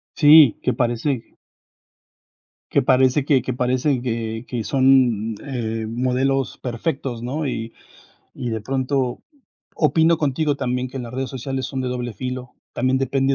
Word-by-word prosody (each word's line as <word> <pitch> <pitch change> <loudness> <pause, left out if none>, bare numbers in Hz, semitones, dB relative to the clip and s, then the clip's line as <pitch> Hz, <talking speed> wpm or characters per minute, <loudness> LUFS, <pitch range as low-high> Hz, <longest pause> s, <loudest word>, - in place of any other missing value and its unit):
Sí, 150 -4 +7
que - - 0
parece 120 +1 -2 1.4
que - - +3
parece 130 +2 +3
que 140 -3 +3
que 130 - -3
parece, 125 +2 0
que 115 -1 -3
que 120 -3 -3
son, 130 -4 +3
mm, - - -8
eh, 115 -5 -3
modelos 130 +3 0
perfectos, 125 -1 -3
¿no? 145 +5 -2
Y 115 -3 -4 0.6
y 125 - -4
de 110 -1 -2
pronto 130 +1 -1 0.5
opino 160 +1 +3
contigo 150 0 0
también 125 -1 -2
que 130 - -7
las 120 -1 -7
redes 130 +1 -3
sociales 130 0 -4
son 135 -1 -4
de 130 - -2
doble 125 -1 -3
filo, 125 +2 -6 0.2
también 130 +2 +1
depende 135 +1 +1
130 Hz, 150 wpm, -21 LUFS, 120-135 Hz, 1.4 s, Sí